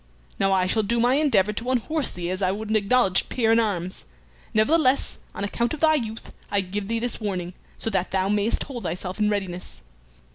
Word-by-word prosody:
Now 195 - +2
I 185 -1 +3
shall 220 +4 +2
do 235 +3 0
my 245 +2 +4
endeavor 265 -9 +3
to 230 +4 -4
unhorse 270 +4 +1
thee 175 0 -4
as 185 +1 -3
I 185 -1 +2
would 215 +2 -4
an - - +2
acknowledged 205 -2 +3
peer 225 -3 +1
in 225 - +5
arms. 185 -5 -2 0.5
Nevertheless, 265 +4 +2 0.2
on - - -4
account 235 +7 -1
of - - -13
thy 315 -1 +5
youth, 225 -6 -3 0.2
I 200 - +2
give 195 +2 -4
thee 230 +1 -1
this 240 0 -3
warning, 185 -4 -3 0.2
so 225 - -3
that 190 -2 0
thou 190 0 0
mayst 210 +2 +1
hold 255 -4 -7
thyself 180 +2 -4
in 210 0 +3
readiness." 190 - -4
210 Hz, 210 wpm, -24 LUFS, 190-235 Hz, 0.5 s, in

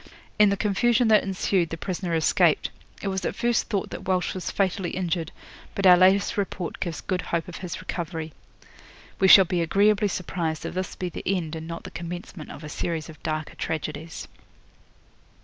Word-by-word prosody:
In 210 -1 +7
the 200 - 0
confusion 230 +4 +2
that 215 -1 +6
ensued 190 -2 0
the 165 - -5
prisoner 180 0 -2
escaped. 160 - +3 0.3
It - - -2
was 190 -1 -2
at - - -2
first 240 0 +1
thought 200 -4 -1
that - - -7
Walsh 185 -1 +1
was 185 -2 -4
fatally 190 -2 0
injured, 170 -3 -2 0.4
but 195 - -1
our 180 -1 +10
latest 190 +4 +4
report 190 -3 -3
gives 170 -4 -3
good 185 -1 -1
hope 170 -2 -2
of 180 - -7
his 180 -2 -6
recovery. 165 -3 -5 0.9
'We 190 - +5
shall 190 0 +10
be 175 0 0
agreeably 205 +5 +3
surprised 165 -4 -3
if - - -4
this 185 0 -3
be 180 - -3
the - - -7
end 175 -4 -1
and 160 0 -6
not 165 0 -6
the - - -9
commencement 175 -1 -7
of 155 - -9
a - - -6
series 165 +1 -3
of 155 - -12
darker 155 -1 -3
tragedies.' 160 0 -4
180 Hz, 185 wpm, -25 LUFS, 165-195 Hz, 0.9 s, our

